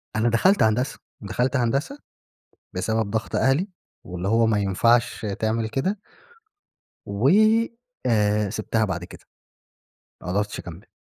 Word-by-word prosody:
أنا 115 +2 +2
دخلت 185 - +3
هندسة، 115 +5 0 0.2
دخلت 125 +7 -1
هندسة 135 - 0 0.7
بسبب 110 -2 -1
ضغط 110 0 -2
أهلي 140 +9 +2 0.4
واللي 90 +1 -5
هو 115 +2 +3
ما 110 -2 +2
ينفعش 115 +4 +2
تعمل 110 0 0
كده 190 - -1 1.1
و 100 +7 +1 0.8
آآ، 105 -2 +2
سيبتها 110 +1 -1
بعد 90 -3 -3
كده. - - -12 1.0
ما - - -9
قدرتش 100 +2 -1
أكمل. 90 +5 -10
110 Hz, 120 wpm, -24 LUFS, 105-125 Hz, 1.1 s, دخلت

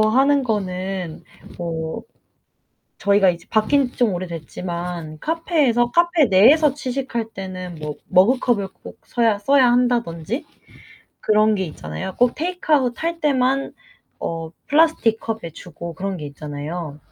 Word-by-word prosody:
하는 270 +6 +4
거는 190 -6 -3 0.4
뭐 160 -2 -4 1.0
저희가 200 -1 +4
이제 170 -1 -3
바뀐지 250 +4 +2
좀 235 -5 +2
오래됐지만 170 -1 -5
카페에서 295 - +1
카페 345 -1 +4
내에서 260 +9 +5
취식할 255 -5 -3
때는 185 -2 -6
뭐 150 -1 -5
머그컵을 215 +1 +3 0.2
꼭 - - -11
써야 230 -4 +1
써야 255 +2 +4
한다든지 240 - 0 0.8
그런게 215 -2 +3
있잖아요. 150 - -6
꼭 245 0 +3
테이크아웃 310 -7 0
할 335 0 -2
때만 275 -2 +1 0.5
어 165 -1 -4 0.2
플라스틱 290 -8 +3
컵에 225 -7 -4
주고 170 0 -9
그런 195 +1 -3
게 150 -4 -6
있잖아요. 145 +2 -6
215 Hz, 275 characters per minute, -21 LUFS, 175-260 Hz, 1.0 s, 내에서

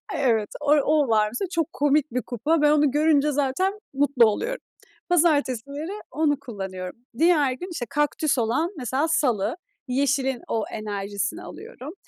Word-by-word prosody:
Evet, 225 -5 +1
o 295 - -6
o 295 -1 +2
var 215 -1 +3
mesela 295 - -3
çok 330 0 -1
komik 290 0 +1
bir 250 - -1
kupa. 295 +7 0
Ben 295 - +5
onu 295 -2 +4
görünce 300 0 +3
zaten 295 +9 0
mutlu 270 -4 +4
oluyorum. 485 - -1 0.5
Pazartesileri 295 - +1 0.2
onu 295 -2 +1
kullanıyorum. 190 -6 -6 0.2
Diğer 310 -5 +4
gün, 355 +9 -7
işte 245 -8 -4
kaktüs 295 0 +1
olan 245 +10 +1
mesela 270 +4 -1
salı, 255 - +1 0.3
yeşilin 265 -1 0
o 220 -2 0
enerjisini 205 -2 -3
alıyorum. 420 - -9
280 Hz, 145 wpm, -24 LUFS, 240-310 Hz, 0.5 s, Ben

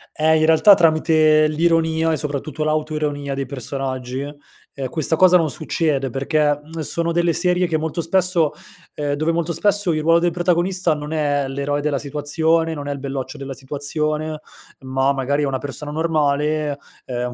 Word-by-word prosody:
Eh, 160 +1 +3
in 155 0 +3
realtà 160 +6 +7
tramite 155 -2 +4
l'ironia 160 0 +1
e - - +1
soprattutto 150 +1 -4
l'autoironia 150 -2 -2
dei 135 0 -3
personaggi, 130 -1 -4 0.5
ehm, 135 -2 -4
questa 160 +3 0
cosa 180 +1 +6
non 165 -3 +2
succede 145 -3 -1
perché, 145 +3 0
mhmm, 160 +2 -8
sono 170 +2 -1
delle 170 0 +2
serie 180 +1 +2
che 160 -2 0
molto 160 +2 -3
spesso 170 -2 +2 0.4
ehm, 145 -1 -2
dove 155 +3 0
molto 170 0 -1
spesso, 205 0 +2
il 155 - -1
ruolo 165 +2 +4
del 175 0 +1
protagonista 180 0 +1
non 150 +1 -7
è 145 -3 0
l'eroe 140 +2 -2
della 145 -1 -1
situazione, 160 +3 0
non 145 -2 -6
è - - -2
il 140 - -5
belloccio 135 -1 -5
della 135 0 -6
situazione, 150 +3 -3 0.4
ma 130 +1 0
magari 140 +2 -1
è - - 0
una 135 -1 -1
persona 145 +2 -6
normale, 150 -2 0 0.3
ehm, 125 -1 -4
155 Hz, 170 wpm, -20 LUFS, 140-165 Hz, 0.5 s, realtà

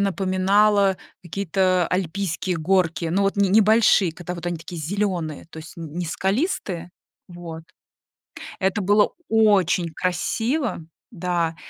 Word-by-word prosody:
напоминало 195 +1 +2 0.3
какие-то 185 0 0
альпийские 180 -1 -2
горки. 170 0 +1
Ну, 185 +5 +1
вот 195 +1 0
не 200 -1 +3
небольшие, 210 -3 +4
когда 175 +1 -7
вот 170 - -8
они 175 -1 -2
такие 165 +1 -8
зелёные, 175 -3 -2
то 160 - -12
есть 160 +1 -10
не 165 +1 -5
скалистые 190 - -2 0.4
Вот. 170 -2 -9 1.0
Это 190 +1 0
было 205 +2 +3 0.2
очень 200 -6 +3
красиво, 225 - -1 0.3
да, 170 -3 -1
185 Hz, 120 wpm, -23 LUFS, 170-200 Hz, 1.0 s, небольшие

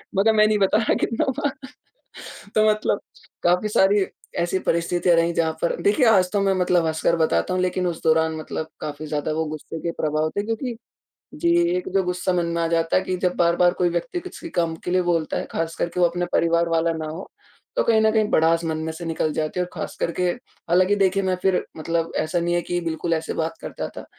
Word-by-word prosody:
मैं 195 - +3
कहा, 225 - +5
"मैं 215 0 +5
नहीं 215 -1 +2
बता 195 +2 +3
रहा, 220 - +2
कितना 230 - 0
हुआ। 290 - 0 1.1
"तो 215 0 +5
मतलब 215 0 +1 0.4
काफ़ी 180 +4 +3
सारी 200 -1 +3 0.3
ऐसी 175 +2 0
परिस्थितियाँ 170 +1 +1
रहीं, 165 0 +2
जहाँ 160 -1 +1
पर - - +1
देखिए, 355 -11 +3
आज 185 -4 +4
तो 205 - +2
मैं 195 -1 +2
मतलब 180 -2 +2
हँसकर 160 +1 +1
बताता 160 - +1
हूँ, 185 - 0
लेकिन 180 0 0
उस 165 -2 -4
दौरान 160 0 +2
मतलब 155 0 -5
काफ़ी 150 0 -5
ज़्यादा 150 0 -2
वो 160 0 -1
गुस्से 155 +1 -6
के 170 - -2
प्रभाव 155 0 0
थे, 205 - +1
क्योंकि 230 +2 -3 0.6
जी, 340 0 +1 0.2
एक 360 - -3
जो 195 - +4
गुस्सा 180 +1 -1
मन 175 -1 +1
में 170 - 0
आ - - +1
जाता 165 -1 +1
है 185 - +3
कि 185 -1 -2
जब 180 -1 0
बार-बार 175 +1 +3
कोई 180 -1 +3
व्यक्ति 175 - -2
किसी 360 -2 -9
काम 165 - 0
के 180 - -2
लिए 185 0 +2
बोलता 170 -2 0
है, - - -4
ख़ासकर 165 +1 -2
के 180 - -4
वो 175 - +6
अपने 175 +1 -2
परिवार 170 0 +2
वाला 165 0 +1
ना 160 -1 -4
हो, 160 +5 -7 0.5
तो - - +3
कहीं 225 -1 +4
न 220 - +4
कहीं 215 -1 +2
भड़ास 165 +1 +3
मन 160 -1 -2
में 160 - -3
से 170 +2 -8
निकल 160 -1 -1
जाती 155 +3 -2
है, - - +2
और - - -18
ख़ासकर 170 - -3
के - - +2
हालाँकि 185 +5 0
देखिए, 195 0 +2
मैं 185 -1 0
फिर, 190 -1 +2
मतलब 165 +1 -2
ऐसा 155 +3 -1
नहीं 175 0 0
है 175 - +1
कि 175 +1 -2
बिल्कुल 165 0 -1
ऐसे 160 0 -3
बात 165 0 -2
करता - - -5
था। - - -7
175 Hz, 230 wpm, -23 LUFS, 165-190 Hz, 1.1 s, वो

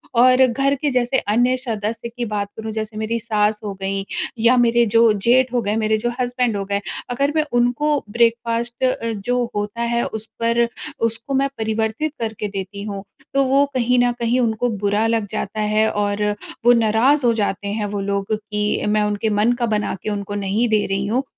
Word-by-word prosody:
और 255 +2 +6
घर 275 +3 +1
के 290 +2 -1
जैसे 250 +1 +1 0.2
अन्य 245 +3 +3
सदस्य 230 -2 -4
की 240 +1 -4
बात 210 -2 -2
करूँ 220 0 -5
जैसे 215 0 -4
मेरी 220 +2 -1
सास 215 -1 0
हो 205 -2 -4
गईं 195 0 -2 0.4
या 250 +2 +6
मेरे 235 0 +4
जो 230 -1 +6
जेठ 245 +5 +2
हो 245 - +2
गए, 210 0 -1
मेरे 220 -1 +1
जो 240 +3 -1
हस्बैंड 245 -3 0
हो 200 - -2
गए 200 +1 -1 0.3
अगर 275 +4 0
मैं 310 - +3 0.2
उनको 285 +4 +1
ब्रेकफास्ट 235 +2 0 0.4
जो 245 0 +1
होता 205 +3 -3
है 235 - +1
उस 220 0 -5
पर 235 +1 +2 0.4
उसको 230 +5 -6
मैं 275 +1 +2
परिवर्तित 220 +6 -1
करके 220 -2 -3
देती 195 +1 -5
हूँ, 200 -2 -5 0.3
तो 275 0 +3
वो 275 +2 +4
कहीं 250 0 +2
न 245 - +2
कहीं 235 +2 +1
उनको 235 0 +1
बुरा 205 +2 +1
लग 225 -2 0
जाता 215 0 -3
है 215 +1 +2
और 205 0 -1 0.4
वो 240 - +8
नाराज़ 235 +5 +3
हो 235 - +4
जाते 205 -2 -2
हैं, 210 +1 -2
वो 205 0 -3
लोग 200 +1 -2
कि 210 0 -2
मैं 210 0 +2
उनके 210 +1 -1
मन 210 +3 +2
का 240 - +2
बना 210 -2 -1
के - - -2
उनको 205 -1 -4
नहीं 215 +5 +1
दे 215 -1 +2
रही 195 +1 -1
हूँ। 245 +6 0
225 Hz, 195 wpm, -20 LUFS, 210-245 Hz, 0.4 s, वो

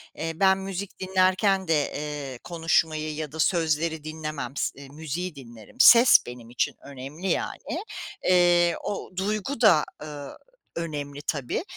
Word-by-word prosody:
Eee, 165 +1 -3
ben 190 +2 +4
müzik 195 0 -6
dinlerken 190 +1 +2
de, 155 -3 +1
eee, 145 -4 -5
konuşmayı 160 -2 0
ya 155 -2 -5
da 160 - -9
sözleri 160 -1 +1
dinlemem, 155 -4 -5
s 140 0 -3
müziği 160 +4 -5
dinlerim. 120 - -13
Ses 240 +1 +9
benim 120 -1 -10
için 120 - -1
önemli 140 +7 -7
yani. - - -3 0.4
Eee, 175 -1 +4
o 205 - -4
duygu 215 +6 -2
da, 180 -9 +6 0.2
ııı, 145 -2 -8 0.4
önemli 145 -4 -5
tabii. 140 - -2
160 Hz, 135 wpm, -26 LUFS, 145-185 Hz, 0.4 s, Ses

